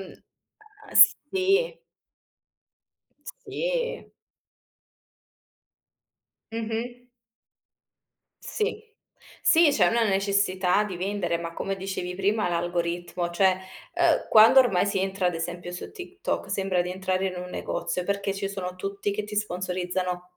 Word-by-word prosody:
uhm - - -10 1.1
Sì 390 +6 +1 1.7
Sì. - - -3 2.4
Mh-mh. 230 +2 -4 1.4
Sì. 435 0 -3 0.6
Sì, 330 -1 +6
c'è 180 -8 +4
una 230 +2 +2
necessità 195 -1 +1
di 190 -4 -5
vendere, 185 -2 -1
ma 170 0 -6
come 195 +3 -3
dicevi 185 -1 -4
prima 200 +1 0
l'algoritmo 175 0 -2
cioè, 185 +1 +3 0.4
uhm 345 -2 +2
quando 225 +5 +8
ormai 200 -7 +2
si 195 -1 0
entra 190 -1 -1
ad 180 - 0
esempio 175 +2 -5
su 180 - -7
TikTok, 370 -1 -5
sembra 190 -2 0
di 180 - -5
entrare 190 0 -1
in 185 - -3
un 180 0 -6
negozio 180 - -3
perché 200 0 -1
ci 195 0 -3
sono 185 -2 -5
tutti 195 +2 -3
che 205 +1 -3
ti 210 0 -8
sponsorizzano 180 -2 -3
195 Hz, 115 wpm, -26 LUFS, 180-220 Hz, 2.4 s, quando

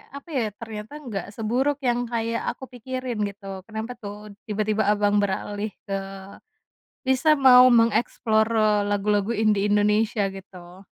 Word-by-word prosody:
apa 280 +4 -10
ya, 260 -6 0
ternyata 220 +3 -8
enggak 215 -7 -5
seburuk 265 +6 -1
yang 245 -1 0
kayak 230 0 -2
aku - - -14
pikirin 255 -1 -5
gitu, 195 -1 -8
kenapa, 220 +2 -5
tuh, 210 0 -9 0.2
tiba-tiba, 215 0 0
Abang 205 0 +3
,beralih 205 +1 -2 0.2
ke - - -11 1.2
bisa 265 +4 +4
mau 255 -1 +8
mengeksplor 230 -1 +2 0.4
lagu-lagu 205 +1 0
indie 215 -2 +2
Indonesia, 210 0 +2
gitu? 185 -1 -12
215 Hz, 125 wpm, -24 LUFS, 205-240 Hz, 1.2 s, mau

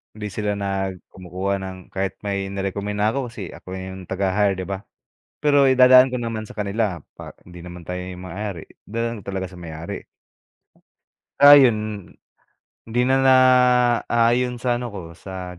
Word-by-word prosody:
Hindi 105 -1 -5
sila 105 +1 -2
nag 95 -2 -3
kumukuha 95 +2 -3
ng 95 -1 -7
kahit 95 0 -3
may 100 -1 -2
ni-recommend 100 +1 -3
na 105 - +3
ako, 125 0 -3
kasi 100 -7 -7
ako 95 - -10
'yong 95 0 -7
taga-hire, 95 +2 +1
‘di 95 - -5
ba? 95 +2 -6 0.5
Pero 145 -1 +3
idadaan 130 0 +7
ko 125 - -2
naman 115 -2 -4
sa 110 0 -12
kanila 100 -2 -1 0.2
pa - - -10 0.2
hindi 90 -1 -12
naman 90 -1 -10
tayo 90 0 -4
'yong 90 0 -8
may-ari. 95 -1 -6 0.2
Dadaan 115 0 -4
talaga 95 0 -4
sa 95 - -14
may-ari. 85 -2 -7 1.4
Ah, 145 0 +11
'yon, 110 -7 +2 0.8
hindi 115 +2 -1
na 130 +2 +3
naaayon 125 -1 +4
sa 120 -1 +1
ano 125 - -4
ko, 100 - -5 0.2
sa 90 -2 -8
100 Hz, 160 wpm, -22 LUFS, 95-120 Hz, 1.4 s, Ah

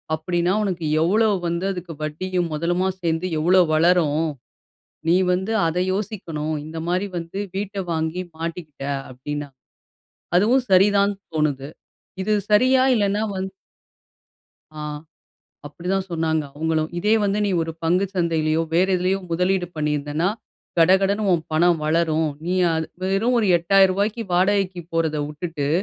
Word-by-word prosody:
அப்படின்னா, 175 +3 0
உனக்கு 180 -5 -2 0.2
எவ்ளோ 215 +6 +3 0.2
வந்து 170 +2 -2
அதுக்கு 180 -2 -7
வட்டியும் 175 +3 -2
மொதலுமா 175 +4 0
சேர்ந்து 165 +1 0
எவ்ளோ 180 +3 +5
வளரும். 165 -2 +3 0.8
நீ 170 - +5 0.2
வந்து 190 +4 -1
அத 165 +2 -1
யோசிக்கணும். 180 -7 -3
இந்த 160 +1 -7
மாதிரி 185 +3 0
வந்து 165 +3 -6 0.2
வீட்ட 200 0 -4 0.2
வாங்கி 160 +2 -2 0.2
மாட்டிக்கிட்ட." 165 -4 -6 0.3
அப்படினா. 145 +3 -5 0.9
அதுவும் 235 +8 +4
சரிதான் 200 +2 +4 0.2
தோணுது. 145 -3 0 0.5
இது 215 +3 0 0.2
சரியா? 255 +5 +5
இல்லைன்னா 205 -1 +1
வந்து 190 0 -4 1.2
ஆ 155 - -9 0.9
அப்படி 170 +4 -10
தான் 195 -1 -1
சொன்னாங்க 160 -2 0
அவங்களும். 160 +1 -1
"இதே 210 +4 +2
வந்து, 200 0 +1
நீ 200 - 0
ஒரு 165 0 -3
பங்கு 180 +4 +2
சந்தையிலேயோ, 165 -2 +1
வேற 175 +3 +4
எதிலயோ 185 +2 0
முதலீடு 180 +1 +1
பண்ணியிருந்தன்னா, 150 +2 -1 0.5
கடகடன்னு 190 +5 +4
உன் 170 -3 +1
பணம் 170 +1 +3
வளரும். 160 0 +1 0.2
நீ 180 - 0 0.2
அது 160 0 -1 0.3
வெறும் 230 +6 +2
ஒரு 225 - +2
ரூ.8000க்கு 195 +5 +2
வாடகைக்கு 190 0 +1
போறத 160 -2 0
விட்டுட்டு. 150 -1 -4
175 Hz, 130 wpm, -22 LUFS, 160-195 Hz, 1.2 s, எவ்ளோ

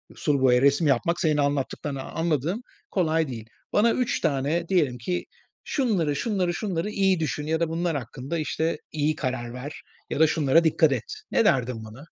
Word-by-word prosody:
sulu 145 -3 0
boya 125 -1 +5
resim 140 +3 +4
yapmak, 145 +6 +1
senin 155 -2 +2
anlattıklarından 140 -1 -1
anladığım, 165 - 0 0.3
kolay 160 -4 +1
değil. 115 -3 -7 0.3
Bana 225 +3 +4
3 250 -2 0
tane 155 +3 0
diyelim 150 -10 +2
ki: 175 +10 -3 0.4
“Şunları, 195 - 0
şunları, 185 +1 0
şunları 190 -1 -2
iyi 195 -3 +2
düşün 150 -1 -2
ya 160 +1 +1
da 170 -1 0
bunlar 165 -1 -1
hakkında, 130 +5 -5
işte, 160 +1 -1
iyi 155 0 0
karar 130 -5 -3
ver 125 +4 -7 0.3
ya - - -2
da 160 - +6
şunlara 155 +1 +3
dikkat 160 -1 +4
et.” 135 - -1 0.3
Ne 230 - +3
derdin 125 - +1
bana? 110 +7 -11
155 Hz, 170 wpm, -25 LUFS, 135-170 Hz, 0.4 s, da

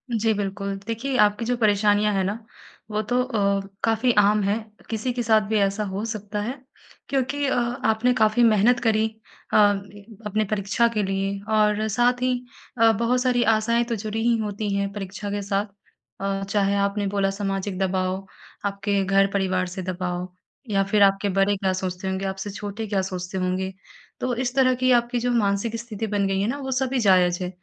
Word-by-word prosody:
जी, 220 0 +2
बिल्कुल। 200 -1 -3
देखिए, 245 +4 -2
आपकी 210 +2 +3
जो 245 +1 +1
परेशानियाँ 210 -1 +3
हैं 195 -1 +1
न 205 +4 -2 0.5
वो 210 0 0
तो 245 +4 0
अ, 200 -5 +1 0.2
काफ़ी 225 +2 +2
आम 210 +1 +5
है 200 +2 +1 0.3
किसी 225 +3 -2
के 240 -1 -2
साथ 220 -1 +4
भी 220 0 +1
ऐसा 200 +2 +1
हो 195 +1 -4
सकता 210 -2 -4
है 230 +5 -3 0.6
क्योंकि 280 +1 0
अ, - - +1 0.3
आपने 220 +3 +3
काफ़ी 220 0 +3
मेहनत 230 +2 +4
करी। 220 -1 +3 0.5
अ, - - +5 0.7
अपने 215 +1 0
परीक्षा 205 +3 +1
के 210 - 0
लिए 195 +1 -2
और 215 0 +2
साथ 245 +3 +2
ही 255 0 +2 0.5
अ, 225 - +7
बहुत 235 +3 +1
सारी 250 -1 +2
आशाएँ 230 +2 +1
तो 230 - +1
जुड़ी 215 +1 -3
ही 235 -1 +3
होती 210 -1 -3
हैं 200 0 -1
परीक्षा 200 0 -6
के 205 - -2
साथ 200 +1 -1 0.6
अ, 195 0 -1
चाहे 200 0 +1
आपने 200 0 -1
बोला 195 0 +1
सामाजिक 195 -1 -3
दबाव, 190 0 -1 0.4
आपके 200 0 0
घर 195 +1 +3
परिवार 190 -2 +1
से 185 +1 -6
दबाव 180 0 -3 0.4
या 195 -1 +2
फिर 200 +1 +3
आपके 195 +1 +3
बड़े 195 +1 +2
क्या 190 -1 0
सोचते 185 0 -4
होंगे 190 +1 -2
आपसे 190 +1 -4
छोटे 205 +2 -5
क्या 200 -2 0
सोचते 185 0 -5
होंगे 185 +1 -1 0.5
तो 250 -1 -1
इस 255 +1 -2
तरह 255 -1 +4
की 255 +1 +2
आपकी 240 0 +2
जो 245 +1 0
मानसिक 215 0 +1
स्थिति 225 -1 -5
बन 205 -1 0
गई 195 0 0
है 205 - 0
न 240 - 0
वो 265 - -4
सभी 260 0 0
जायज 180 -4 +4
है। 180 - -2
205 Hz, 190 wpm, -24 LUFS, 195-230 Hz, 0.7 s, अ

